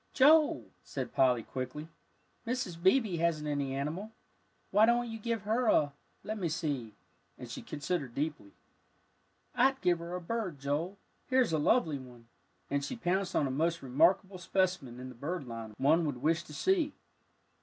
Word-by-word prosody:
"Joel," 300 +2 +5
said - - -5
Polly, 125 -3 +3
quickly, 130 +6 -5 0.6
"Mrs. 195 -9 -3
Beebe 190 -1 +3
hasn't 160 -2 0
any 140 -2 -1
animal. 160 +10 -3 0.6
Why 210 +3 +6
don't 240 0 +2
you 225 - -6
give 230 -2 -2
her 225 +4 +1
a 145 -8 +3 0.3
let 215 0 -4
me 175 -4 -1
see," 140 -9 -3 0.4
and - - -9
she - - -6
considered 145 -3 -3
deeply. 150 -8 -3 1.0
"I'd 265 +2 +3
give 175 -1 +2
her 170 +1 -5
a - - -2
bird, 185 -3 -3
Joel, 150 +8 -2 0.3
here's 255 -8 +3
a 155 - +2
lovely 155 - +2
one," 125 -2 -13 0.4
and 140 0 -1
she 150 - -4
pounced 190 -3 -1
on 145 - +3
a 135 - -1
most 165 +4 0
remarkable 180 +8 +3
specimen 180 -9 0
in 130 0 -7
the - - -9
bird 145 +5 -4
line 115 -2 -7
one 160 +6 +4
would 130 -3 -4
wish 160 +2 +2
to 150 - -11
see. 340 - +2
165 Hz, 165 wpm, -32 LUFS, 140-210 Hz, 1.0 s, Why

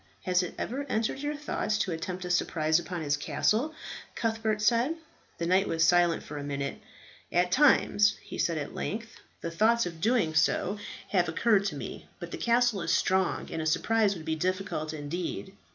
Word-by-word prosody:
"Has 180 0 +2
it 180 - -6
never 270 +5 -3
entered 230 0 -1
your 295 +1 -2
thoughts 290 -7 -1
to 195 - -1
attempt 180 +3 -4
a 180 - -3
surprise 160 -2 +2
upon 175 -1 -5
his 145 -1 +1
castle?" 230 - 0 0.4
Cuthbert 225 -2 0
said. 235 +8 +2 0.4
The 170 - -2
knight 185 +3 +3
was 165 0 +1
silent 175 0 +4
for 150 0 -7
a - - -5
minute. 140 -1 -4 0.5
"At 180 0 +2
times," 215 -7 +4
he - - -8
said 165 -2 +1
at 145 - -4
length, 230 +2 -5 0.3
"thoughts 220 +8 +2
of 175 - -4
so 165 - -15
doing 210 -5 +2 0.7
have 180 -4 +2
occurred 200 +4 +3
to 200 - -2
me; - - -7
but - - -7
the - - -5
castle 235 -3 +2
is - - -1
strong, 190 -1 +1
and 160 - -3
a 155 - -2
surprise 210 +5 +2
would 160 -3 -9
be 160 - 0
difficult 185 -2 -2
indeed." 150 - -4
185 Hz, 185 wpm, -29 LUFS, 165-225 Hz, 0.7 s, silent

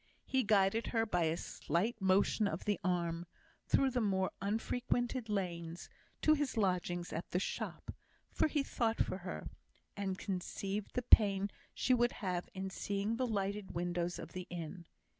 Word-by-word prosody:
He 265 - +2
guided 210 0 +3
her 225 -1 +1
by 180 -5 +1
a 160 +1 +1
slight 200 +11 -1
motion 195 +2 +3
of 170 -2 -3
the 205 -1 +1
arm, 170 -2 0 0.4
through 270 -1 +4
the 250 -1 +1
more 190 -3 +1
unfrequented 240 +3 -1
lanes, 170 -4 -3 0.3
to 310 - +7
his 290 -5 0
lodgings 180 -3 0
at 165 - -4
the - - 0
shop; - - -4 0.4
for - - +3
he 295 -2 +1
thought 230 -4 0
for 185 - 0
her, 180 0 -5 0.5
and 195 -2 -2
conceived 195 +2 -3
the 250 - 0
pain 200 -3 +5 0.2
she 255 - +3
would 240 0 +3
have 180 -4 -2
in 190 0 -3
seeing 200 +4 -1
the 255 0 +1
lighted 200 -2 -2
windows 175 0 -1
of - - -8
the 185 -1 -5
inn. 170 0 -6
195 Hz, 160 wpm, -35 LUFS, 180-225 Hz, 0.5 s, to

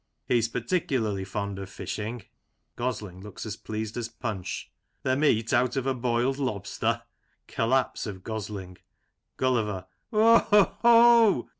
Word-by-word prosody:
He's 115 -2 +2
particularly 115 - -1
fond 100 0 -4
of 95 -1 -7
fishing 110 +3 -5 0.2
— - - -50
{Gosling 105 -7 -4
looks 105 +1 -8
as 110 -2 -4
pleased 110 0 -5
as 120 -1 -3
Punch) 105 -7 -5
— - - -48
the 130 - +2
meat 120 -6 +2
out 125 0 +2
of 135 -2 -1
a 135 - +1
boiled 125 +2 0
lobster. 115 -1 -1 0.4
{Collapse 125 +1 0
of 95 -3 -7
Gosling,) 100 -4 -6 0.6
Gulliver: 110 -7 0 0.3
Ho! 225 +1 +6
ho! 210 -2 +3
ho! 235 -2 +6
115 Hz, 140 wpm, -27 LUFS, 105-130 Hz, 0.6 s, Ho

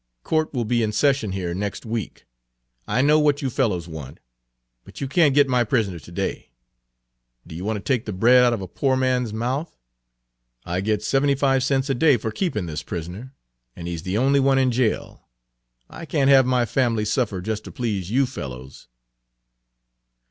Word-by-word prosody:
Court 155 0 0
will 125 -4 -2
be 120 +2 +1
in 110 -1 0
session 135 -1 +1
here 90 -3 -3
next 100 +4 -4
week. 115 -2 -5 0.6
I 125 - +1
know 150 +2 +5
what 145 -1 +2
you 130 - -1
fellows 100 -10 0
want, 75 -5 -9 0.6
but - - -13
you 140 - -3
can't 145 -1 +3
get 145 -1 +5
my 125 -2 +2
prisoner 105 -6 -1
to 70 - -14
day. - - -4 1.0
Do - - -11
you 85 +3 -6
want 110 +1 -1
to - - -7
take 130 -5 0
the 105 - -4
bread 120 +6 +5
out 120 - +4
of 115 -4 -2
a - - -6
poor 130 +8 0
man's 125 -3 0
mouth? 125 +9 -3 0.9
I 90 +2 -2
get 105 +1 -1
seventy 140 +3 +2
five 135 -1 +2
cents 135 0 +1
a 135 - +1
day 140 +1 +4
for 110 0 -4
keeping 110 - -2
this 75 -3 -5
prisoner, 90 - -7 0.4
and 85 - -7
he 85 - -3
's 80 - -6
the 95 +4 -2
only 135 +4 +3
one 135 0 +3
in 130 -1 +3
jail. 120 -2 -1 0.7
I 165 - -10
can't 140 -3 +2
have 135 -2 +6
my 125 -2 +2
family 115 -3 0
suffer 110 -3 -1
just 110 +3 -4
to - - -8
please 105 -7 -3
you 135 +5 +2
fellows." 65 - -8
120 Hz, 190 wpm, -23 LUFS, 100-135 Hz, 1.0 s, have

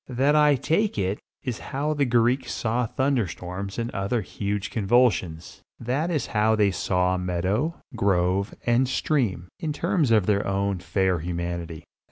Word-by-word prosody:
That, 135 +4 +2
I 150 -1 +5
take 165 - 0
it, 100 +1 -1 0.2
is 125 -4 -3
how 145 +3 -2
the 145 -2 +1
Greeks 120 +2 +2
saw 120 +1 -1
thunder 130 -3 0
storms 90 +3 -6
and 120 +1 -2
other 100 +4 -1
huge 100 0 -3
convulsions; 100 -7 +1 0.2
that 135 +8 -1
is 155 -8 0
how 110 0 +3
they 105 -2 +3
saw 90 0 0
meadow, 90 - -1 0.2
grove 95 -1 +1
and 125 +2 +3
stream 115 - 0
in 155 -2 -2
terms 165 -3 +1
of 110 -4 +4
their 100 0 +1
own 100 -1 0
fair 95 -1 0
humanity. 85 -1 -4
105 Hz, 155 wpm, -25 LUFS, 95-130 Hz, 0.2 s, I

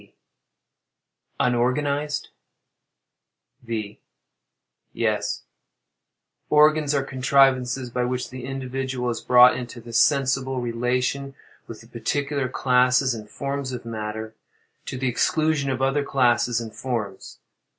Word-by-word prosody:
P. - - -24 1.2
Unorganized? 140 +5 0 1.3
V. 110 -3 -5 0.9
Yes; - - -1 1.1
organs 150 -1 +4
are 140 - +1
contrivances 130 -2 +2
by 125 +1 -1
which 125 0 -3
the 125 -1 -7
individual 130 -1 -3
is 115 - -5
brought 125 0 +7
into 120 -1 -8
sensible 135 0 +2
relation 125 +3 -1 0.3
with 115 0 -11
particular 140 +3 -2
classes 125 +1 +3
and 105 -2 -8
forms 140 0 -4
of 125 - -6
matter, 110 -1 -5 0.5
to - - -4
the 130 +1 -1
exclusion 155 +3 +1
of 130 0 -1
other 135 +2 +1
classes 120 -3 +2
and 115 -2 -7
forms. 110 -7 -5
125 Hz, 105 wpm, -24 LUFS, 120-135 Hz, 1.3 s, brought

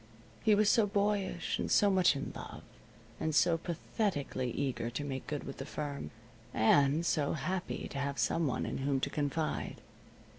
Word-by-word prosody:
He 215 -2 +5
was 210 0 +3
so 215 0 +5
boyish, 200 -3 0
and - - -1
so 205 -1 +5
much 185 -5 +4
in 140 - -4
love, - - -8 0.6
and 155 -1 -1
so 170 +3 +5
pathetically 165 - -2
eager 125 -2 -2
to 125 +5 -4
make 135 -2 -5
good 145 -2 -3
with 135 - -7
the - - -3
firm, 145 -2 -4 0.5
and 140 +8 +4
so 150 -4 +1
happy 185 +5 -3
to 140 - -5
have 140 0 -2
some 165 -2 +1
one 130 - -1
in - - -3
whom 135 0 +1
to 140 - -2
confide. 150 +2 -2
150 Hz, 175 wpm, -32 LUFS, 140-185 Hz, 0.6 s, He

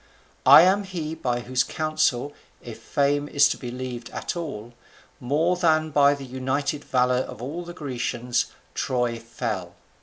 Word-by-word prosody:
I - - +10
am 195 +3 +3
he 170 -5 -5
by 125 -6 -2
whose 125 +1 +1
counsels, 155 -3 0 0.3
if - - -10
Fame 145 +1 0
is 145 0 +5
to - - -1
be 125 - -6
believed 125 -1 -6
at - - -4
all, 120 -9 -6 0.5
more 155 +8 +1
than 155 -3 +2
by 145 0 +5
the 140 -1 -9
united 135 +3 -2
valour 125 -1 +2
of 125 -3 -8
all 145 +9 -5
the 175 0 -9
Grecians, 125 -4 -2 0.3
Troy 120 -2 -1
fell. 110 -6 -5
135 Hz, 155 wpm, -24 LUFS, 125-155 Hz, 0.5 s, I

